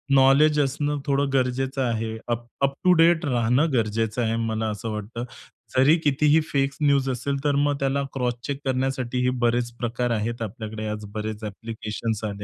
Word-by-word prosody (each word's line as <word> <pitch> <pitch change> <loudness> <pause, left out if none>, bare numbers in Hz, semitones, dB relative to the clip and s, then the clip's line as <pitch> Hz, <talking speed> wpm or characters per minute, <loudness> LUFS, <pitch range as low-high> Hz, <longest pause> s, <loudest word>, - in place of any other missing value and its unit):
Knowledge 140 +3 +5
असणं 145 +1 -1
थोडं 140 0 +1
गरजेचं 135 +1 0
आहे. 110 -2 -2
अप 120 0 -2 0.2
अप 140 0 +2
टू 180 - +7
डेट 165 -1 +4
राहणं 125 +4 +2
गरजेचं 110 0 0
आहे 115 0 0
मला 110 -1 -1
असं 105 +2 -4
वाटतं. 105 +3 -5 0.5
जरी 140 +5 +6
कितीही 150 +2 +4
फेक 135 -1 +1
न्यूज 140 -2 +3
असेल, 140 +3 -3
तर 145 - +2
मग 145 0 +1
त्याला 140 0 0
क्रॉस 125 -2 0
चेक 140 -1 -3
करण्यासाठीही 130 -1 0 0.2
बरेच 120 0 +1
प्रकार 120 +1 -1
आहेत 115 +1 -2
आपल्याकडे 110 0 -5 0.2
बरेच 110 0 -4
ॲप्लिकेशन्स 110 +1 -4
आले 100 -1 -5
125 Hz, 160 wpm, -24 LUFS, 110-140 Hz, 0.5 s, टू